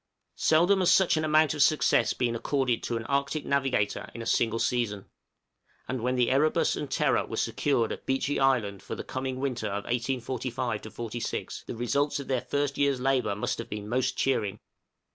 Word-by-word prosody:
Seldom 175 Hz, +5 st, +4 dB
has 185 Hz, -, +4 dB
such 190 Hz, -4 st, +4 dB
an 155 Hz, -, 0 dB
amount 155 Hz, 0 st, +3 dB
of 150 Hz, -, -2 dB
success 135 Hz, -6 st, +4 dB
been 120 Hz, -2 st, 0 dB
accorded 130 Hz, 0 st, 0 dB
to 120 Hz, -, -2 dB
an 115 Hz, -, -6 dB
Arctic 140 Hz, +3 st, -1 dB
navigator 135 Hz, -7 st, 0 dB
in 115 Hz, -, -5 dB
a -, -, -8 dB
single 115 Hz, 0 st, +1 dB
season, 115 Hz, -5 st, -1 dB, 0.8 s
and 130 Hz, -2 st, -3 dB
when 125 Hz, +2 st, 0 dB
the 125 Hz, -1 st, +2 dB
'Erebus' 150 Hz, +4 st, +2 dB
and -, -, -5 dB
'Terror' -, -, +1 dB
were -, -, -5 dB
secured 120 Hz, -6 st, 0 dB
at -, -, -7 dB
Beechey 135 Hz, +2 st, 0 dB
Island 120 Hz, -8 st, +1 dB
for -, -, -6 dB
the -, -, -6 dB
coming 130 Hz, 0 st, -4 dB
winter 125 Hz, -5 st, -2 dB
of 100 Hz, 0 st, -3 dB
1845 125 Hz, -2 st, -2 dB, 0.3 s
6, -, -, -4 dB
the -, -, -5 dB
results 140 Hz, +5 st, 0 dB
of 140 Hz, -, -7 dB
their 130 Hz, -2 st, 0 dB
first 145 Hz, -1 st, -2 dB
year's 140 Hz, -2 st, +2 dB
labor 130 Hz, -5 st, +1 dB
must 105 Hz, -, -2 dB
have -, -, -6 dB
been 105 Hz, 0 st, -5 dB
most 125 Hz, +3 st, 0 dB
cheering. 105 Hz, -6 st, 0 dB
130 Hz, 185 wpm, -28 LUFS, 115-140 Hz, 0.8 s, Seldom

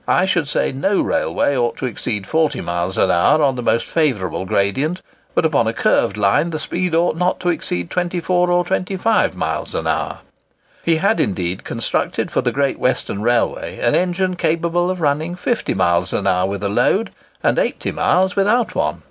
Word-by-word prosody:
I 185 Hz, -, +3 dB
should 175 Hz, -6 st, 0 dB
say 150 Hz, -, 0 dB
no 190 Hz, +10 st, 0 dB
railway 140 Hz, -, 0 dB
ought 120 Hz, -2 st, 0 dB
to -, -, -3 dB
exceed 105 Hz, -4 st, -3 dB
40 160 Hz, +6 st, +1 dB
miles 85 Hz, +2 st, -2 dB
an 95 Hz, -, +3 dB
hour 150 Hz, -, +3 dB
on 135 Hz, -2 st, +2 dB
the 125 Hz, -, -4 dB
most 115 Hz, 0 st, +1 dB
favourable 110 Hz, -, 0 dB
gradient; 135 Hz, -, 0 dB, 0.3 s
but -, -, +2 dB
upon -, -, +2 dB
a -, -, 0 dB
curved 100 Hz, -, +1 dB
line 105 Hz, +11 st, +2 dB
the 160 Hz, -, -3 dB
speed 175 Hz, +2 st, -2 dB
ought 170 Hz, 0 st, +2 dB
not 180 Hz, +2 st, 0 dB
to 180 Hz, -, 0 dB
exceed 90 Hz, -, -2 dB
24 180 Hz, 0 st, 0 dB
or 175 Hz, 0 st, +2 dB
25 190 Hz, +4 st, 0 dB
miles -, -, -3 dB
an -, -, -2 dB
hour." -, -, -2 dB, 0.6 s
He 165 Hz, -, +2 dB
had, 200 Hz, +7 st, +1 dB
indeed, 90 Hz, -2 st, -1 dB
constructed -, -, -2 dB
for -, -, +1 dB
the -, -, 0 dB
Great 140 Hz, -1 st, 0 dB
Western 105 Hz, -5 st, -1 dB
Railway 120 Hz, +1 st, 0 dB
an 120 Hz, -, +1 dB
engine 185 Hz, +1 st, +1 dB
capable 170 Hz, +2 st, 0 dB
of 185 Hz, -1 st, -3 dB
running 155 Hz, +3 st, 0 dB
50 225 Hz, +6 st, -1 dB
miles 85 Hz, -1 st, +1 dB
an -, -, -1 dB
hour 90 Hz, 0 st, +2 dB
with 100 Hz, +1 st, -4 dB
a -, -, +1 dB
load, 125 Hz, -, +1 dB, 0.3 s
and -, -, +2 dB
80 -, -, -1 dB
miles 185 Hz, 0 st, +1 dB
without 215 Hz, +3 st, +2 dB
one. -, -, -1 dB
155 Hz, 190 wpm, -19 LUFS, -, 0.6 s, I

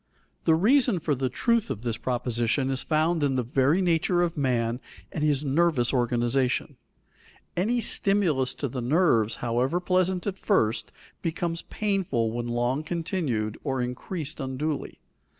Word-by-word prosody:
The 160 Hz, -, +5 dB
reason 220 Hz, -, +3 dB
for 155 Hz, -2 st, 0 dB
the 130 Hz, -1 st, -1 dB
truth 230 Hz, -, +1 dB
of 110 Hz, -, -4 dB
this 115 Hz, -2 st, -2 dB
proposition 125 Hz, +2 st, -1 dB
is 130 Hz, -, -1 dB
found 160 Hz, +1 st, +1 dB
in 140 Hz, -2 st, +1 dB
the 125 Hz, -, +1 dB
very 135 Hz, +9 st, +2 dB
nature 175 Hz, +1 st, +2 dB
of 170 Hz, -1 st, -1 dB
man 120 Hz, -4 st, 0 dB, 0.3 s
and 150 Hz, -, -3 dB
his 150 Hz, -1 st, +1 dB
nervous 140 Hz, -4 st, +2 dB
organization. 120 Hz, +1 st, 0 dB, 0.8 s
Any 230 Hz, +7 st, +1 dB
stimulus 185 Hz, -, +2 dB
to 140 Hz, -, -3 dB
the 125 Hz, 0 st, -4 dB
nerves, 120 Hz, -, +2 dB
however 125 Hz, +8 st, +1 dB
pleasant 185 Hz, 0 st, +1 dB
at 195 Hz, -2 st, -3 dB
first, 115 Hz, -, +1 dB, 0.3 s
becomes 165 Hz, 0 st, -2 dB
painful 185 Hz, -, -1 dB
when 120 Hz, +1 st, -3 dB
long 120 Hz, +4 st, 0 dB
continued 155 Hz, -, -2 dB
or 135 Hz, -3 st, -1 dB
increased 140 Hz, +6 st, -4 dB
unduly. 140 Hz, +2 st, -3 dB
145 Hz, 145 wpm, -26 LUFS, 125-175 Hz, 0.8 s, The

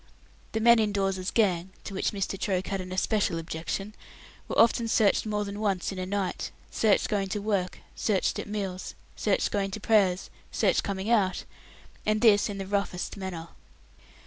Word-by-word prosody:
The 220 Hz, -, 0 dB
men 235 Hz, +1 st, +6 dB
in 215 Hz, -1 st, +2 dB
Dawes's 195 Hz, -2 st, 0 dB
gang 185 Hz, -5 st, +2 dB
to -, -, -7 dB
which 195 Hz, -, 0 dB
Mr. 195 Hz, -1 st, -2 dB
Troke 190 Hz, -2 st, -1 dB
had 195 Hz, -1 st, -1 dB
an 185 Hz, 0 st, -8 dB
especial 190 Hz, -1 st, +1 dB
objection 165 Hz, +5 st, -4 dB, 0.5 s
were -, -, -3 dB
often 230 Hz, 0 st, +4 dB
searched 220 Hz, -1 st, +3 dB
more 210 Hz, -1 st, -1 dB
than 200 Hz, +1 st, -6 dB
once 200 Hz, -4 st, 0 dB
in 190 Hz, -, -5 dB
a 185 Hz, -, -3 dB
night, 195 Hz, -1 st, -2 dB, 0.2 s
searched 215 Hz, -3 st, +3 dB
going 200 Hz, -2 st, 0 dB
to 200 Hz, +2 st, -2 dB
work, 200 Hz, -3 st, -1 dB, 0.2 s
searched 200 Hz, -4 st, 0 dB
at -, -, -5 dB
meals, 195 Hz, -3 st, -4 dB, 0.2 s
searched 205 Hz, -3 st, +1 dB
going 200 Hz, -1 st, 0 dB
to 195 Hz, -, -5 dB
prayers, 200 Hz, -4 st, +2 dB, 0.2 s
searched -, -, +2 dB
coming 200 Hz, +2 st, -3 dB
out, 195 Hz, -5 st, +2 dB, 0.6 s
and 215 Hz, 0 st, +1 dB
this 215 Hz, -4 st, +5 dB
in 200 Hz, -, -4 dB
the 195 Hz, -, -4 dB
roughest 200 Hz, -2 st, -2 dB
manner. 180 Hz, -4 st, -6 dB
200 Hz, 175 wpm, -28 LUFS, 185-210 Hz, 0.6 s, men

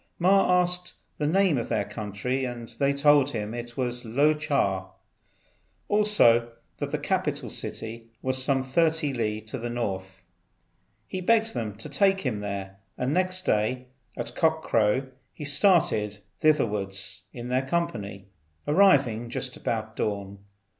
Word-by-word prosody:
Ma 180 Hz, 0 st, +4 dB
asked 180 Hz, 0 st, -3 dB, 0.2 s
the 150 Hz, -, +1 dB
name 180 Hz, -4 st, +3 dB
of 115 Hz, -, -5 dB
their -, -, 0 dB
country, 110 Hz, +5 st, -3 dB
and 120 Hz, -2 st, -5 dB
they 140 Hz, 0 st, +3 dB
told 140 Hz, 0 st, +4 dB
him 110 Hz, -4 st, -4 dB
it 120 Hz, 0 st, -7 dB
was 125 Hz, -1 st, -2 dB
Lo 140 Hz, +7 st, +3 dB
ch'a. 120 Hz, -11 st, 0 dB, 1.0 s
Also 120 Hz, -, +4 dB, 0.3 s
that -, -, -2 dB
the -, -, -1 dB
capital -, -, -2 dB
city 115 Hz, +1 st, -5 dB
was 130 Hz, 0 st, +1 dB
some 135 Hz, -1 st, +1 dB
30 155 Hz, +1 st, +1 dB
li 110 Hz, -3 st, -1 dB
to 110 Hz, +4 st, -6 dB
the 120 Hz, +1 st, -4 dB
north. 95 Hz, -5 st, -4 dB, 0.8 s
He 185 Hz, -, -5 dB
begged 225 Hz, +3 st, +2 dB
them 105 Hz, -3 st, -3 dB
to 110 Hz, -, -8 dB
take 195 Hz, -1 st, +2 dB
him 120 Hz, -7 st, -2 dB
there, 100 Hz, -1 st, -5 dB, 0.2 s
and 125 Hz, +3 st, -1 dB
next 185 Hz, +1 st, +1 dB
day 125 Hz, +4 st, 0 dB, 0.3 s
at 120 Hz, 0 st, -4 dB
cock 160 Hz, 0 st, +2 dB
crow 115 Hz, +5 st, +2 dB, 0.2 s
he 150 Hz, -, -8 dB
started 145 Hz, -, +3 dB, 0.2 s
thitherwards 100 Hz, -9 st, +1 dB
in 120 Hz, 0 st, -7 dB
their 130 Hz, +1 st, +2 dB
company, 105 Hz, -, -2 dB, 0.4 s
arriving 140 Hz, -, +4 dB
just 125 Hz, +1 st, -4 dB
about 110 Hz, -1 st, -3 dB
dawn. 100 Hz, -1 st, -3 dB
125 Hz, 145 wpm, -26 LUFS, 110-155 Hz, 1.0 s, Ma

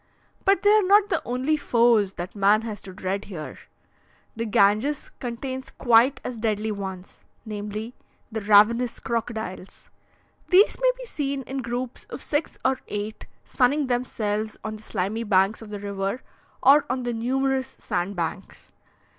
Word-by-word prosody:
But 390 Hz, -1 st, +3 dB
they 410 Hz, -, +6 dB
are 430 Hz, 0 st, +6 dB
not 405 Hz, +1 st, +4 dB
the -, -, +1 dB
only 255 Hz, +5 st, 0 dB
foes 235 Hz, -8 st, +3 dB
that 175 Hz, +2 st, -6 dB
man 205 Hz, +2 st, +4 dB
has 215 Hz, -4 st, -5 dB
to 190 Hz, -, -10 dB
dread 190 Hz, +2 st, -3 dB
here; 165 Hz, -7 st, -8 dB, 0.8 s
the 230 Hz, +1 st, -2 dB
Ganges 215 Hz, +8 st, +2 dB
contains 260 Hz, +2 st, -5 dB
quite 240 Hz, +3 st, +4 dB
as 245 Hz, -, -5 dB
deadly 215 Hz, -1 st, -1 dB
ones, 190 Hz, -2 st, -7 dB, 0.3 s
namely 210 Hz, +2 st, -5 dB, 0.4 s
the 220 Hz, 0 st, -3 dB
ravenous 215 Hz, +4 st, +4 dB
crocodiles. 220 Hz, -5 st, -5 dB, 0.6 s
These 390 Hz, +3 st, +5 dB
may -, -, +5 dB
be -, -, -8 dB
seen 280 Hz, -, -3 dB
in 270 Hz, +1 st, -4 dB
groups 245 Hz, +1 st, -4 dB
of -, -, -7 dB
six 300 Hz, +1 st, -1 dB
or 260 Hz, 0 st, +2 dB
eight, 210 Hz, +1 st, -5 dB, 0.2 s
sunning 280 Hz, +3 st, +2 dB
themselves 220 Hz, -4 st, -2 dB
on 215 Hz, 0 st, -4 dB
the -, -, -16 dB
slimy 215 Hz, +2 st, -2 dB
banks 195 Hz, 0 st, +2 dB
of 220 Hz, -, -10 dB
the 210 Hz, -, -5 dB
river 200 Hz, +3 st, -3 dB, 0.4 s
or 285 Hz, +2 st, +7 dB
on 255 Hz, 0 st, -1 dB
the 240 Hz, -1 st, -2 dB
numerous 265 Hz, +3 st, -1 dB
sandbanks. 180 Hz, +1 st, -4 dB
230 Hz, 150 wpm, -25 LUFS, 205-260 Hz, 0.8 s, or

